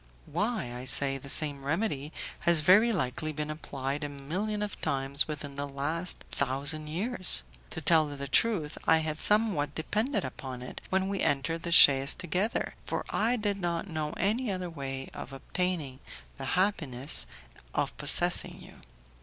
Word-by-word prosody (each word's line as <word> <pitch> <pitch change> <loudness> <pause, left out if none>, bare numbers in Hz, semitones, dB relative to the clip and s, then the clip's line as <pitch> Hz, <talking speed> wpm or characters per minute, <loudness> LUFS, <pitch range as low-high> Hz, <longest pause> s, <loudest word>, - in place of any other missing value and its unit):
"Why," 180 - -2
I 125 +1 -7
said, 135 0 +5
"the 140 - -9
same 145 -1 +2
remedy 150 -2 -2 0.3
has 170 -2 +4
very 205 +9 +6
likely 155 - -2
been 150 0 -4
applied 140 -1 -4
a 145 - -3
million 185 +10 -3
of 205 - -6
times 135 +1 0
within 145 -2 -6
the 145 0 -3
last 155 +6 0
thousand 140 +3 -1
years. 185 - +4 0.3
To 160 - -6
tell 155 0 +4
you 145 - -7
the 140 0 -6
truth, 165 - +1
I 160 - +6
had 155 -1 -3
somewhat 205 -10 +2
depended 215 - -1
upon 130 -1 -7
it, 125 - -8
when 190 0 +1
we 195 0 -2
entered 165 +4 0
the 170 - -5
chaise 140 -4 +7
together, 180 +6 -1
for - - -3
I 230 +3 +2
did 205 -3 -1
not 170 +1 -2
know 155 -3 -3
any 220 +3 0
other 185 -2 -4
way 135 -3 -6
of - - -8
obtaining 155 -2 -3 0.4
the - - -5
happiness 150 -9 +1 0.5
of - - -1
possessing - - +1
you. - - -14
155 Hz, 160 wpm, -29 LUFS, 140-185 Hz, 0.5 s, chaise